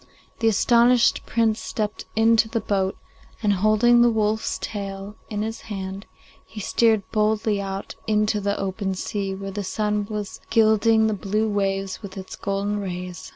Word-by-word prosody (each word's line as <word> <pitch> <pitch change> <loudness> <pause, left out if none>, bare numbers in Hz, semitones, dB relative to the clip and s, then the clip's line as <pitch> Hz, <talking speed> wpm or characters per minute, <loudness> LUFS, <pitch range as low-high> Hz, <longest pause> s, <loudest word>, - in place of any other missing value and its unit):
The 225 - +2
astonished 235 +2 +4
Prince 225 -1 +1
stepped 210 -1 -4
into 225 0 +4
the 230 - -1
boat, 195 -2 -1 0.5
and, 205 -1 +3
holding 215 +5 +4
the 240 - +6
wolf's 220 -1 0
tail 200 0 -6
in 210 -1 -2
his 225 +1 -5
hand, 195 -1 -6 0.4
he 220 - -10
steered 220 +1 +2
boldly 215 -1 +1
out 195 0 -5
into 210 -1 +1
the 200 +1 -1
open 195 0 -2
sea, 195 +1 -3
where 195 0 -6
the 205 +1 -4
sun 210 +1 -1
was 210 -2 -5
gilding 220 0 +4
the 220 - +1
blue 210 +2 -1
waves 195 -2 -1
with 200 -2 -9
its 190 -1 -7
golden 200 +1 -2
rays. 180 -2 -6
210 Hz, 155 wpm, -23 LUFS, 195-220 Hz, 0.5 s, the